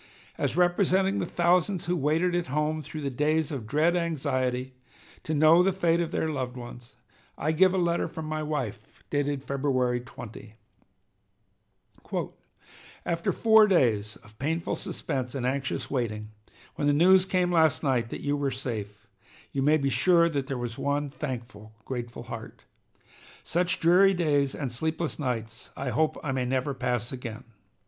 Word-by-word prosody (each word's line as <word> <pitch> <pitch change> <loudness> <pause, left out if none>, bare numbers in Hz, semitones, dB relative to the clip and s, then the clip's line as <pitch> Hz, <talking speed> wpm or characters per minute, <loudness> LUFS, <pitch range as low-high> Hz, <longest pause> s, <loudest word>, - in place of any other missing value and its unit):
As - - -2
representing 185 +2 +3
the 175 - -2
thousands 175 +2 +2
who 175 +1 0
waited 165 +4 +1
at 175 0 0
home 150 +3 -1
through 155 +2 -7
the 140 -1 -2
days 155 +4 +1
of 125 -7 -5
dread 155 +7 +2
anxiety 130 -6 -1 0.5
to 155 - -2
know 155 +3 +6
the 190 +2 +3
fate 175 -2 +1
of 170 - -1
their 160 - -1
loved 130 -5 -3
ones, 120 0 -10 0.4
I 155 - 0
give 185 +4 +5
a 190 - 0
letter 170 -1 +1
from 160 -1 -7
my 155 0 -3
wife 130 -9 -5
dated 145 -1 -1
February 130 -3 0
20: 115 -2 -11 2.5
"After 170 0 0
four 220 -1 +5
days 110 - +2
of 105 +1 -19
painful 160 +4 -1
suspense 130 -4 -4
and 130 -3 -2
anxious 130 +1 -2
waiting, 110 -5 -2 0.4
when 145 - -1
the 145 - +4
news 185 +5 +5
came 180 -1 +1
last 160 -3 +3
night 125 -5 +1
that - - -6
you 145 0 0
were 140 -1 0
safe, 105 -6 -5 0.5
you 135 - 0
may 150 +3 +4
be 140 -2 0
sure 170 +7 +4
there 140 -3 -2
was 120 -1 -5
one 145 0 -1
thankful, 115 -7 -7
grateful 120 -2 -5
heart. - - -9 0.8
Such 175 +1 0
dreary 190 +3 +5
days 145 -5 +1
and 135 -4 -3
sleepless 160 +7 -2
nights 115 -5 -4
I 135 - -2
hope 155 +6 +1
I 150 - -2
may 130 -1 -1
never 130 +2 -1
pass 125 -2 -2
again. 120 -4 -7
145 Hz, 160 wpm, -27 LUFS, 125-170 Hz, 2.5 s, know